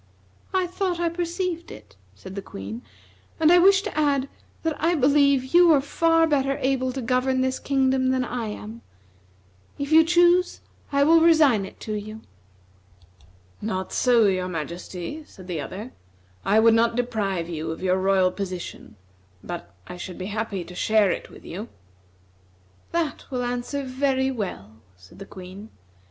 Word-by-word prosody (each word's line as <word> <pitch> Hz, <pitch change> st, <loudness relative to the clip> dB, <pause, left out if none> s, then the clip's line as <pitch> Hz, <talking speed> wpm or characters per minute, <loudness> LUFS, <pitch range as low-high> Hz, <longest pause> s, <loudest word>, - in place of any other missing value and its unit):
"I 375 Hz, -1 st, +1 dB
thought 360 Hz, -1 st, -2 dB
I 340 Hz, -1 st, +1 dB
perceived 345 Hz, 0 st, -3 dB
it," 105 Hz, -1 st, -13 dB, 0.2 s
said 185 Hz, -, -11 dB
the 200 Hz, -, -5 dB
Queen, 105 Hz, -, -8 dB, 0.6 s
"and 320 Hz, 0 st, +5 dB
I 355 Hz, -, +7 dB
wish 390 Hz, +2 st, +5 dB
to 420 Hz, -, -5 dB
add 285 Hz, -3 st, +1 dB, 0.4 s
that 320 Hz, -2 st, 0 dB
I 340 Hz, +2 st, +3 dB
believe 280 Hz, -1 st, +3 dB
you 350 Hz, -1 st, +7 dB
are 290 Hz, -, +5 dB
far 330 Hz, +4 st, +2 dB
better 275 Hz, -3 st, +1 dB
able 260 Hz, -1 st, 0 dB
to 265 Hz, -1 st, -4 dB
govern 255 Hz, +2 st, +1 dB
this 260 Hz, 0 st, -1 dB
kingdom 265 Hz, -1 st, +1 dB
than 260 Hz, -1 st, +1 dB
I 240 Hz, -2 st, -4 dB
am. 215 Hz, +2 st, -8 dB, 1.0 s
If 280 Hz, +1 st, -4 dB
you 320 Hz, +1 st, +8 dB
choose 350 Hz, +2 st, +3 dB, 0.3 s
I 280 Hz, 0 st, +3 dB
will 325 Hz, +2 st, +5 dB
resign 300 Hz, -, +4 dB
it -, -, -15 dB
to 215 Hz, -, -4 dB
you." 215 Hz, +1 st, -6 dB, 1.4 s
"Not 190 Hz, -3 st, -3 dB
so, 240 Hz, -3 st, +4 dB
your 185 Hz, -2 st, +1 dB
majesty," 175 Hz, -, -6 dB
said 185 Hz, -, -14 dB
the 175 Hz, -4 st, -4 dB
other; 210 Hz, -, -7 dB, 0.5 s
"I 215 Hz, -, +3 dB
would 225 Hz, 0 st, +6 dB
not 230 Hz, +1 st, +3 dB
deprive 210 Hz, -8 st, -1 dB
you 160 Hz, -2 st, -4 dB
of 160 Hz, +3 st, -6 dB
your 185 Hz, 0 st, +2 dB
royal 190 Hz, -1 st, +3 dB
position, 185 Hz, -, -7 dB, 0.5 s
but 175 Hz, -1 st, -7 dB
I 180 Hz, -, -9 dB
should 175 Hz, 0 st, -7 dB
be 185 Hz, -, -5 dB
happy 210 Hz, -4 st, -3 dB
to 180 Hz, -, -12 dB
share 210 Hz, +1 st, +2 dB
it -, -, -5 dB
with -, -, -15 dB
you." 205 Hz, +7 st, -7 dB, 1.2 s
"That 335 Hz, -3 st, -2 dB
will 250 Hz, -2 st, -2 dB
answer 245 Hz, +3 st, -3 dB
very 265 Hz, 0 st, 0 dB
well," 110 Hz, -, -6 dB, 0.2 s
said 90 Hz, -, -17 dB
the 195 Hz, -, -9 dB
Queen. 190 Hz, +3 st, -10 dB
250 Hz, 165 wpm, -24 LUFS, 190-295 Hz, 1.4 s, you